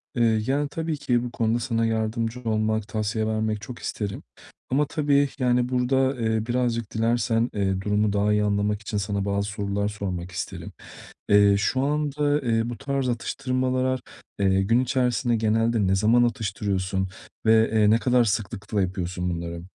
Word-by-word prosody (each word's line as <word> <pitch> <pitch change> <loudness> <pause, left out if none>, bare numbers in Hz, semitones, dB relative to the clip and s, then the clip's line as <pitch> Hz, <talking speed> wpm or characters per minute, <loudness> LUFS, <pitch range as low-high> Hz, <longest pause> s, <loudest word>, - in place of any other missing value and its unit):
Eee, 115 -2 +3
yani, 145 +2 +1
tabii 160 0 -3
ki 125 -4 0
bu 120 - -5
konuda 115 +1 0
sana 115 -1 0
yardımcı 115 +2 -1
olmak, 110 -1 0
tavsiye 110 0 -1
vermek 110 -1 -1
çok 120 +3 -8
isterim. 100 -2 -4 0.5
Ama 145 +3 +2
tabii, 145 -2 +2
yani, 125 -1 +2
burada, 130 +1 +1
eee, 110 -1 0
birazcık 120 -3 -1
dilersen, 115 +1 +1
eee, 95 -2 0
durumu 105 0 +1
daha 105 +1 +2
iyi 105 0 +2
anlamak 105 0 0
için 105 0 -4
sana 100 -1 -2
bazı 100 0 -1
sorular 100 0 -2
sormak 95 -4 -4
isterim. 85 - -6 0.6
Eee, 100 -1 +6
şu 130 +5 0
anda, 145 0 0
eee, 115 -2 0
bu 120 - -5
tarz 140 -2 -2
atıştırmalar, 130 +3 -1 0.4
eee, 95 -1 +3
gün 115 +5 +3
içerisinde 125 -2 +1
genelde 110 -1 +1
ne 95 - +3
zaman 115 +5 +4
atıştırıyorsun? 100 -4 -1 0.4
Ve, 110 0 +5
eee, 110 -2 +4
ne 110 - +5
kadar 125 -1 +3
sıklıkla 100 -1 -2
yapıyorsun 90 -1 -2
bunları? 85 0 -4
110 Hz, 160 wpm, -25 LUFS, 100-125 Hz, 0.6 s, Eee